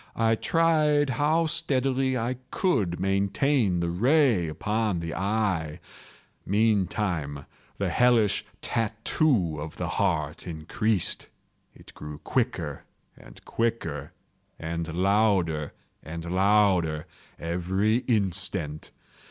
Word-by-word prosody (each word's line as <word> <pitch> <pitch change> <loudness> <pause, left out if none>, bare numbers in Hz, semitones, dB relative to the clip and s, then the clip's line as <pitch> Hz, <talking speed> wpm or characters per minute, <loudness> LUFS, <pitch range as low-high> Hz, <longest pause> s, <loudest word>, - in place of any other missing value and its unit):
I 115 0 +2
tried 150 0 +2
how 155 +4 +2
steadily 135 -5 +1
I 120 +2 -2
could 100 - 0
maintain 100 +2 +1
the 85 0 -1
ray 120 - +3
upon 105 +4 -1
the 85 0 -4
eve. 95 -6 -1 0.7
Meantime 95 -8 0 0.3
the - - -1
hellish 120 -5 +3 0.2
tattoo 115 - 0
of 80 0 -7
the - - -3
heart - - -1
increased. 90 +5 -2 0.5
It - - -15
grew 75 -1 -8
quicker - - -2 0.3
and - - -16
quicker, 85 -11 -2 0.5
and 85 0 -4
louder 90 -4 +1 0.3
and 85 +1 -7
louder 95 -5 +3 0.3
every 95 +6 0
instant. 95 - -1
100 Hz, 95 wpm, -26 LUFS, 85-120 Hz, 0.7 s, ray